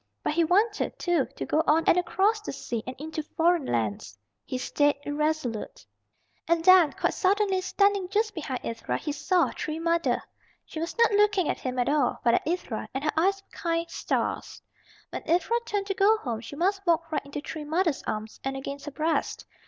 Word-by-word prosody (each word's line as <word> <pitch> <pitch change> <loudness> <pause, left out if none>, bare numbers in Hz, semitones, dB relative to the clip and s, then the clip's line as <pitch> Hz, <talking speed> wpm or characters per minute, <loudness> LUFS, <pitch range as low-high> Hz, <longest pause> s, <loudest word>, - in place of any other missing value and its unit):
But - - 0
he 335 +2 +3
wanted, 415 +6 +1
too, 345 -6 +1
to - - -4
go 310 - +2
on 320 +2 +4
and - - +5
across 385 +5 +1
the - - -5
sea 235 -2 -4
and 255 - -5
into 310 +2 -4
foreign 325 0 +1
lands. 105 -2 -2 0.3
He 255 - -4
stayed 290 +3 +2
irresolute. 290 -6 -2 0.6
And 335 0 +1
then 370 -5 +7
quite - - 0
suddenly, 390 -1 +2
standing 400 0 +2
just 430 +2 +1
behind 275 -7 -4
Ivra, 230 0 -3
he 300 - -4
saw 345 +4 +1
Tree 310 +1 -4
Mother. 335 0 +1 0.5
She 315 - -7
was 330 +7 -4
not 465 -1 +5
looking 410 -4 +3
at - - -1
him 255 -1 -4
at 245 - +1
all, 290 -3 +1
but 235 - +4
at - - +1
Ivra, 355 +2 -3
and 265 - -2
her 300 - +1
eyes 390 +4 +2
were - - -43
kind 335 0 -1
stars. - - -2 0.5
When - - -4
Ivra 360 +8 +2
turned 405 -1 -1
to 395 - -1
go 405 +3 +4
home 235 - -4
she 235 +4 -9
must 390 +5 0
walk 330 -1 +2
right 310 - -1
into 280 +1 -6
Tree 300 +1 -6
Mother's 320 0 0
arms 215 0 -4
and 270 0 -2
against 280 +1 -6
her 295 - -5
breast. 315 +3 -1
330 Hz, 200 wpm, -27 LUFS, 285-375 Hz, 0.6 s, then